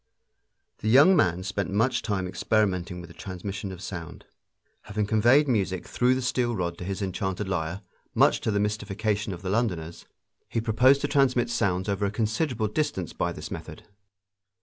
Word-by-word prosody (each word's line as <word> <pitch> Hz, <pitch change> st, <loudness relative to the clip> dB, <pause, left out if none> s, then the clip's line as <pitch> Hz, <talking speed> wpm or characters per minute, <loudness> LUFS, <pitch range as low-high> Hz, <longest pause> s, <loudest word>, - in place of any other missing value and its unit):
The -, -, -4 dB
young 145 Hz, +11 st, +7 dB
man 90 Hz, -, +2 dB
spent 100 Hz, -1 st, -2 dB
much 115 Hz, +7 st, +1 dB
time 100 Hz, -4 st, -2 dB
experimenting 90 Hz, -3 st, 0 dB
with 85 Hz, -, -10 dB
the -, -, -12 dB
transmission 95 Hz, +1 st, -6 dB
of 95 Hz, +1 st, -9 dB
sound. 85 Hz, -2 st, -7 dB, 0.6 s
Having 105 Hz, 0 st, -1 dB
conveyed 120 Hz, +8 st, +4 dB
music 95 Hz, -7 st, 0 dB
through 125 Hz, +1 st, +2 dB
the 130 Hz, -, -2 dB
steel 120 Hz, -1 st, 0 dB
rod 85 Hz, -3 st, -2 dB
to -, -, -5 dB
his 95 Hz, +2 st, -3 dB
enchanted 95 Hz, +1 st, -2 dB
lyre, 90 Hz, 0 st, -2 dB, 0.3 s
much -, -, +4 dB
to -, -, -1 dB
the 100 Hz, -1 st, +1 dB
mystification 105 Hz, 0 st, -1 dB
of 90 Hz, 0 st, -7 dB
the 95 Hz, -, -2 dB
Londoners, 90 Hz, -7 st, -2 dB, 0.4 s
he -, -, -1 dB
proposed 125 Hz, +5 st, +4 dB
to 145 Hz, -, 0 dB
transmit 130 Hz, -4 st, +2 dB
sounds 95 Hz, -5 st, 0 dB
over 100 Hz, 0 st, 0 dB
a -, -, -1 dB
considerable 110 Hz, +3 st, -1 dB
distance 105 Hz, -, -2 dB
by -, -, -1 dB
this -, -, -8 dB
method. -, -, -8 dB
105 Hz, 170 wpm, -26 LUFS, 95-120 Hz, 0.6 s, young